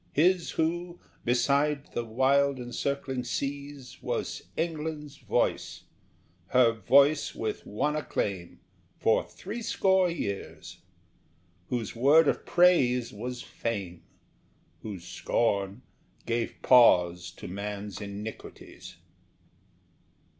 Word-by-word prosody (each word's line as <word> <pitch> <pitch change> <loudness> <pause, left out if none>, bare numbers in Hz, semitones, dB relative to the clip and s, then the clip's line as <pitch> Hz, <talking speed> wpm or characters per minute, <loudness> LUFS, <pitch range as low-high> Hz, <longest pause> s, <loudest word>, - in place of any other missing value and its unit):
His 175 +3 +3
who, 175 +2 -1 0.2
beside 140 +4 +1
the 120 - -1
wild 135 +4 +2
encircling 130 +1 -3
seas, 140 0 -5
Was - - -3 0.2
England's 155 -3 -3
voice, - - -1 0.6
her 125 -2 +5
voice 140 +8 +3
with 110 - -4
one 145 +9 -1
acclaim, 100 - -3 0.4
For - - +2
threescore 190 -4 0
years; 100 - -5 0.9
whose 120 -2 -3
word 145 +6 +5
of - - -1
praise 125 -9 +3
was 120 +4 -6
fame, 100 -7 -4 0.8
Whose 95 -6 -7
scorn 100 +3 -1 0.4
gave 115 0 -2
pause 90 -8 +5
to - - -9
man's 100 +1 -5
iniquities. 105 +2 -9
125 Hz, 90 wpm, -28 LUFS, 105-150 Hz, 0.9 s, her